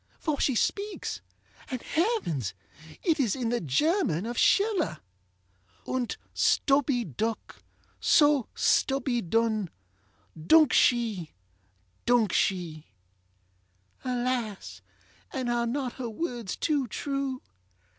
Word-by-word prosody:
for 305 -4 -2
she 265 - +2
speaks, 405 - -2 0.5
and, 255 - -3
heavens! 315 - -1 0.5
it 330 -5 +2
is 240 -8 +1
in 245 -4 -2
the 240 0 0
German 175 - +1
of 240 +1 -4
SchillerŌĆö 385 - +2 0.9
ŌĆ£Unt 255 -2 -2 0.2
stubby 275 -4 +2
duk, 220 - -4 0.4
so 290 -5 +4
stubby 265 -3 +2
dun 220 0 0 0.8
Duk 310 -4 +6
she! 220 - +2 0.7
duk 235 -6 +3
she! 170 -5 -1 1.2
ŌĆØ - - -24
Alas! 245 -4 -2 0.5
and 255 -4 -2
are 235 0 0
not 255 0 -2
her 250 -3 -5
words 235 - -4
too 290 -5 0
true? 275 +2 -3
245 Hz, 105 wpm, -28 LUFS, 220-285 Hz, 1.2 s, Duk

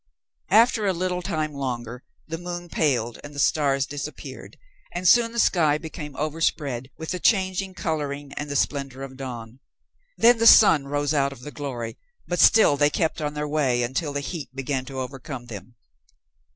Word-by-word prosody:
After 220 0 +4
a 190 - +2
little 180 +1 -2
time 155 -5 -2
longer 125 -3 -5 0.2
the 165 0 -5
moon 175 0 -6
paled 120 -8 0
and 145 0 -10
the - - -5
stars 140 -2 +2
disappeared, 145 0 -8 0.3
and 180 +1 -2
soon 230 +3 +5
the 235 - -8
sky 160 -9 +3
became 155 -2 -8
overspread 145 -4 -2
with 160 - -7
the 180 - -3
changing 190 -2 +1
coloring 145 -4 -3
and 145 0 -5
the 145 - -3
splendor 135 -2 -1
of 135 -1 -8
dawn. 125 -2 -8 0.6
Then 235 0 +5
the 230 - +5
sun 165 -11 +7
rose 145 +1 -1
out 140 -2 +1
of 130 -3 -11
the 150 - -8
glory, 130 -6 -6 0.3
but 175 - -2
still 215 -10 +6
they 145 +1 +4
kept 160 +1 -1
on 150 0 -3
their 150 0 -2
way 135 -5 +1
until 130 +5 -2
the 145 0 -3
heat 150 -1 -6
began 135 -1 -2
to 135 0 -6
overcome 130 0 -6
them. 115 0 -10
145 Hz, 180 wpm, -24 LUFS, 135-170 Hz, 0.6 s, sun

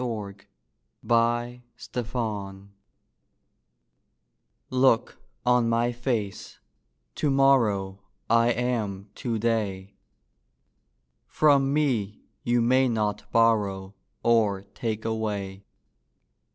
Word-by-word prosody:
ON 105 -5 -4 0.8
A 120 +1 +1 0.4
DIAL 105 -5 -5 2.0
Look 130 - +2 0.3
on 125 -1 +3
my 115 +1 +1
face: 120 -5 -3 0.6
to 150 - -1
morrow 115 -9 +2 0.3
I 115 +1 +4
am 110 -5 -2
to 120 -4 -3
day. 100 -4 -2 1.3
From 140 -3 +3
me 125 -9 -1 0.2
you 120 0 +1
may 130 +2 +3
not 105 -3 -2
borrow 105 -4 +1 0.3
Or 110 -4 +2
take 110 -2 -4
away. 100 -3 -3
115 Hz, 80 wpm, -26 LUFS, 100-120 Hz, 2.0 s, I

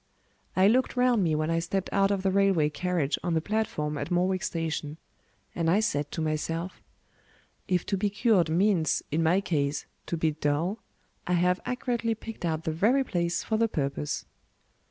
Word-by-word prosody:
I 185 +1 +5
looked 255 +6 +2
round 250 -4 +3
me 160 -3 +1
when 155 +1 0
I 165 - +2
stepped 190 +3 -3
out 195 0 +3
of 200 -2 -1
the 190 - +2
railway 190 -6 +3
carriage 170 -3 -1
on 175 -1 -1
the - - +3
platform 160 -7 -2
at - - -4
Morwick 185 +1 +1
Station; 160 -2 -3 0.6
and 165 -1 0
I 190 +5 +4
said 145 -9 0
to - - -2
myself, 165 +3 -3 0.9
"If 180 -2 +1
to 195 - -1
be 205 +2 +1
cured 205 -5 +2
means, 170 -2 +2
in 155 +3 +1
my 170 +4 +3
case, 145 -6 -1 0.2
to 170 - -2
be 160 -1 +1
dull, 155 +7 -1 0.5
I 180 - +1
have 180 +1 +2
accurately 240 -2 -1
picked 225 -3 -7
out 160 -1 -1
the 160 - -1
very 225 - +3
place 175 -7 -1
for 220 - 0
the 230 +1 +3
purpose." 145 -5 -2
175 Hz, 180 wpm, -28 LUFS, 160-200 Hz, 0.9 s, I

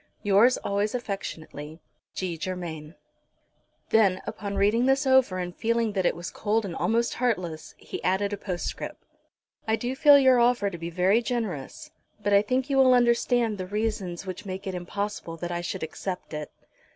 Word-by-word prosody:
"Yours 210 +5 +5
always 205 +3 -1
affectionately, 160 -8 -6 0.4
"G. 185 -3 -2
GERMAIN." 165 -2 -6 0.9
Then, 200 -4 +4
upon 200 0 -5
reading 225 +6 +3
this 270 +2 +3
over 260 -8 +4
and 180 -1 -4
feeling 230 -1 0
that 190 -3 +1
it - - 0
was 175 +1 -6
cold 220 +1 0
and 175 -4 -5
almost 235 +1 +1
heartless, 185 -10 -2
he - - -8
added 200 +2 +1
a - - -2
postscript. 180 -3 -5 0.6
"I 220 - +3
do 245 +3 -3
feel 285 +1 +7
your 260 -2 +5
offer 235 -4 +3
to 170 - -6
be 170 +1 -4
very 185 +6 +3
generous, 220 - -4 0.3
but 205 -1 0
I 200 - +7
think 255 +5 -1
you 275 -2 0
will 260 -1 +6
understand 235 -2 +2
the 185 - -4
reasons 205 -3 -3
which 185 -1 -6
make 190 +1 -6
it 190 - -3
impossible 180 -1 -4
that 175 +1 -5
I 175 0 -2
should 175 - -4
accept 180 +3 -5
it." 150 -1 -5
200 Hz, 175 wpm, -26 LUFS, 180-235 Hz, 0.9 s, feel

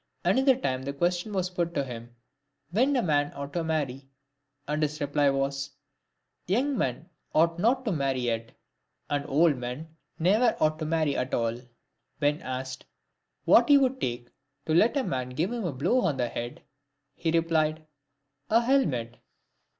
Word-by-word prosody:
Another 265 0 +4
time, 130 - -2
the 140 +1 -4
question 175 +7 -1
was 185 -2 -1
put 170 -1 -2
to 140 - +1
him, 120 -2 -9 0.6
when 255 +9 +2
a 250 - +2
man 145 -3 +1
ought 140 0 -6
to 170 - -1
marry? 140 -4 -2 0.6
and 150 +1 -1
his 150 0 -1
reply 145 -1 +2
was, 135 +1 -1 0.4
" - - -51
Young 260 +10 +1
men 135 - -2 0.3
ought 165 +2 +3
not 255 +6 +2
to 220 - 0
marry 135 -5 0
yet, 115 -1 -2 0.6
and 145 0 -1
old 150 +1 +3
men 125 +6 -6 0.2
never 205 +9 +3
ought 155 0 +2
to 155 - -3
marry 155 -3 +1
at 125 +1 -1
all." 115 -1 0 0.6
When 145 +1 +1
asked 130 0 -5 0.6
what - - +6
he 285 - +8
would 265 -1 +1
take 120 0 -3 0.4
to 155 - 0
let 220 - +4
a 275 - +1
man 130 - -2
give 155 - -1
him 235 -4 -3
a 170 - -1
blow 170 - +1
on 150 - 0
the 120 -2 0
head?" 120 +1 -6 0.5
he 165 - -2
replied, 160 -1 +1 0.6
"A 225 - +5
helmet." 150 - +1
155 Hz, 170 wpm, -27 LUFS, 135-180 Hz, 0.6 s, he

